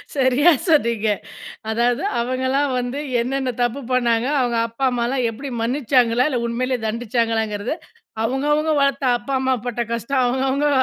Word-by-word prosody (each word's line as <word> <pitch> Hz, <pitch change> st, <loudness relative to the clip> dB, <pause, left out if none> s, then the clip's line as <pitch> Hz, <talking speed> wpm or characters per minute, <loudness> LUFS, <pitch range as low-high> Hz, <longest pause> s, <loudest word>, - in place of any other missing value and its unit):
சரியா 270 Hz, +4 st, +4 dB, 0.2 s
சொன்னீங்க. 235 Hz, -9 st, +2 dB, 0.6 s
அதாவது, 240 Hz, +6 st, +1 dB, 0.2 s
அவங்கலாம் 260 Hz, +3 st, 0 dB
வந்து 245 Hz, +3 st, -3 dB, 0.2 s
என்னென்ன 260 Hz, +1 st, -1 dB
தப்பு 240 Hz, +3 st, 0 dB
பண்ணாங்க. 240 Hz, -1 st, +2 dB
அவங்க 240 Hz, -2 st, +1 dB
அப்பா, 230 Hz, +4 st, -7 dB
அம்மாலாம் 245 Hz, +1 st, 0 dB
எப்பிடி, 270 Hz, +5 st, -7 dB
மன்னிச்சாங்களா 245 Hz, 0 st, +2 dB
இல்ல, 255 Hz, -4 st, -1 dB
உண்மைலயே 250 Hz, +2 st, -1 dB
தண்டிச்சாங்களாங்கிறதை, 225 Hz, +1 st, -1 dB, 0.5 s
அவங்க, 265 Hz, +4 st, -1 dB
அவங்க 310 Hz, +1 st, +1 dB
வளர்த்த 275 Hz, 0 st, +1 dB
அப்பா, 240 Hz, +3 st, -5 dB
அம்மா 260 Hz, 0 st, +2 dB
பட்ட 240 Hz, -1 st, -2 dB
கஷ்டம், 255 Hz, +3 st, 0 dB
அவங்கவங்க 265 Hz, +3 st, +1 dB
250 Hz, 135 wpm, -21 LUFS, 235-270 Hz, 0.6 s, சரியா